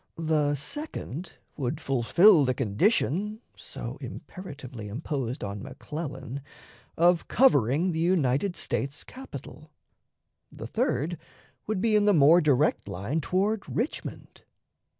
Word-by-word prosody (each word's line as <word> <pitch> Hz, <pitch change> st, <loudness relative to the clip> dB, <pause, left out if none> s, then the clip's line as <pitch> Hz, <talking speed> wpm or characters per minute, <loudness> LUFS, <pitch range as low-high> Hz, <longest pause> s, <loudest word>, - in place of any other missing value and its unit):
The 155 Hz, -3 st, +1 dB
second 175 Hz, -, -5 dB, 0.2 s
would 135 Hz, +1 st, -2 dB
fulfill 155 Hz, -, +5 dB
the 130 Hz, -1 st, +1 dB
condition, 195 Hz, -, +1 dB, 0.2 s
so -, -, -7 dB
imperatively 135 Hz, -, -8 dB
imposed 130 Hz, +2 st, -3 dB
on 100 Hz, 0 st, -5 dB
McClellan, 140 Hz, -1 st, -6 dB, 0.6 s
of 175 Hz, 0 st, +4 dB
covering 170 Hz, -, +3 dB
the 160 Hz, -, -2 dB
United 170 Hz, 0 st, +2 dB
States 140 Hz, +2 st, -2 dB
capital; 155 Hz, -, -10 dB, 0.8 s
the -, -, -8 dB
third 155 Hz, +5 st, -1 dB, 0.5 s
would 210 Hz, -3 st, -1 dB
be 220 Hz, -1 st, +3 dB
in 210 Hz, -1 st, +4 dB
the 205 Hz, -2 st, +5 dB
more 160 Hz, +4 st, +7 dB
direct 150 Hz, -1 st, +2 dB
line 115 Hz, -, -2 dB
toward 195 Hz, +7 st, 0 dB
Richmond. 245 Hz, +7 st, -4 dB
155 Hz, 110 wpm, -27 LUFS, 135-185 Hz, 0.8 s, more